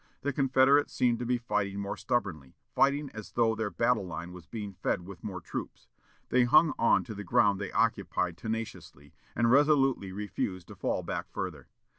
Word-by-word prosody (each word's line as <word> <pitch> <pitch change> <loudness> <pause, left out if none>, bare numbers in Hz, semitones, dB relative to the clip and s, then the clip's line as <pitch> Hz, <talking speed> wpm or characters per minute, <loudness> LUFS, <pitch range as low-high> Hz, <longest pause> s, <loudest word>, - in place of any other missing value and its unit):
The 145 0 -1
Confederates 135 +1 +4
seemed 120 -2 +2
to 120 - -3
be 125 0 +2
fighting 100 -4 -2
more 100 0 -3
stubbornly, 80 - -2 0.2
fighting 140 0 +2
as 110 -1 -9
though 115 -1 +3
their 110 -1 -2
battle 110 +5 +1
line 85 0 -6
was 90 -3 -12
being 105 -3 -6
fed 90 - -1
with 95 -3 -11
more 95 -3 -5
troops. 85 - -7 0.4
They 125 0 +4
hung 155 +5 +5
on 115 - +4
to 115 - -7
the 105 0 -7
ground 100 +1 +3
they 100 - -4
occupied 90 -2 0
tenaciously, 110 - -6 0.2
and 115 0 +3
resolutely 135 -7 +3
refused 95 -2 -4
to - - -10
fall - - -2
back - - -4
further. - - -5
110 Hz, 180 wpm, -29 LUFS, 95-125 Hz, 0.4 s, hung